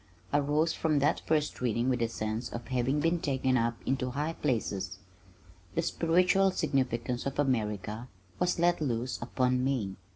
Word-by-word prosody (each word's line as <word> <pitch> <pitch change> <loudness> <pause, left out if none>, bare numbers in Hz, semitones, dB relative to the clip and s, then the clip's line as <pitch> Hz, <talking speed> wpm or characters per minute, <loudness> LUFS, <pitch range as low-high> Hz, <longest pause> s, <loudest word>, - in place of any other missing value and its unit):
I 145 - +5
rose 150 +3 +1
from 155 -2 +1
that 145 +3 +2
first 155 -4 0
reading 120 0 +1
with 125 -2 +1
a 115 - +2
sense 110 +1 -3
of 120 +2 -7
having 130 +3 +1
been 165 +2 +2
taken 130 -3 +1
up 115 -1 +1
into 130 -1 0
high 150 +5 -2
places. 110 -10 -2 0.8
The 165 - +1
spiritual 180 +4 +3
significance 125 -6 -1
of 140 - -4
America 110 -4 -1 0.3
was 180 0 +1
let 175 0 +2
loose 125 -3 -1
upon 125 +1 +1
me. 120 -8 -1
130 Hz, 160 wpm, -30 LUFS, 120-150 Hz, 0.8 s, I